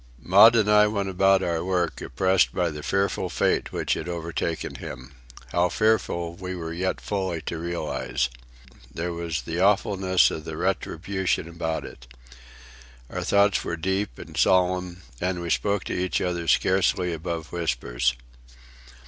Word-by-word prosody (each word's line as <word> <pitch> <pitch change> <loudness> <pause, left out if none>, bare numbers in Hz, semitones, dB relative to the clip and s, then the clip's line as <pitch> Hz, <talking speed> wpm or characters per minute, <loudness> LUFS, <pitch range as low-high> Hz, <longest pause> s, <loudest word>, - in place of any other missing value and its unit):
Maud 105 - +7
and 110 -3 +3
I 105 0 +6
went 100 -2 -2
about 95 +1 +3
our 85 -1 -1
work 90 -2 -1
oppressed 95 0 +1
by 90 -3 +1
the 75 0 -7
fearful 100 +5 0
fate - - 0
which - - -1
had 85 - -4
overtaken 85 -1 -3
him,—how 65 +7 -4
fearful 85 -6 +1
we 90 +1 -6
were 80 -2 -5
yet 95 +2 -1
fully 95 -5 -2
to 85 - -4
realize. 80 -7 -2 0.6
There 85 +5 -3
was 85 -3 -3
the 85 +1 -4
awfulness 95 -2 +3
of 80 +1 -6
retribution 90 +2 -2
about 85 -1 -3
it. - - -12 1.0
Our - - -3
thoughts 100 0 +3
were 85 - -3
deep 95 -3 -2
and - - -10
solemn, 90 -1 +2 0.2
and 90 0 -1
we 85 -1 -3
spoke 100 -1 +1
to - - -4
each 90 0 0
other 85 -2 -2
scarcely 90 +1 +2
above 80 -1 -5
whispers. - - -1
90 Hz, 145 wpm, -25 LUFS, 80-95 Hz, 1.0 s, Maud